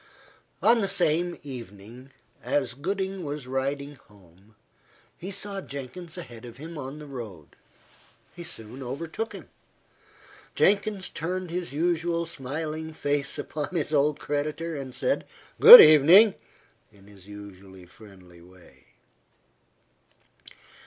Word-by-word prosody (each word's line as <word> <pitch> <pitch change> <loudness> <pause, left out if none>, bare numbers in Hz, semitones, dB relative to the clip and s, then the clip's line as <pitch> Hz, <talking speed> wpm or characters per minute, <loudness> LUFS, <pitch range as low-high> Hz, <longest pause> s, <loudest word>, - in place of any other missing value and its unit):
On 230 0 +4
the 195 - 0
same 175 0 0
evening, 120 -1 -10 0.3
as 130 -1 -1
Gooding 190 +6 -4
was 145 -2 -6
riding 140 +2 -3
home, 100 +1 -23 0.6
he 185 - -8
saw 200 0 -5
Jenkins 155 +5 -9
ahead 120 -9 -10
of 120 -1 -11
him 160 +4 -9
on 140 -1 -7
the 150 - -10
road. 110 - -10 0.8
He 175 - -8
soon 125 -5 -10
overtook 160 - -5
him. - - -11 1.1
Jenkins 200 -1 +1
turned 180 +2 -5
his 175 0 -4
usual 170 +2 -1
smiling 155 +2 -6
face 145 -2 -2
upon 155 +4 -5
his 155 -2 -2
old 150 0 +2
creditor, 155 +3 -3
and 135 -3 -7
said, - - -1 0.4
"Good 475 +2 +13
evening," 175 +8 +7 0.6
in 100 -2 -21
his 100 -2 -17
usual 100 -2 -12
friendly 90 -3 -17
way. 90 0 -20
145 Hz, 120 wpm, -26 LUFS, 120-170 Hz, 1.1 s, Good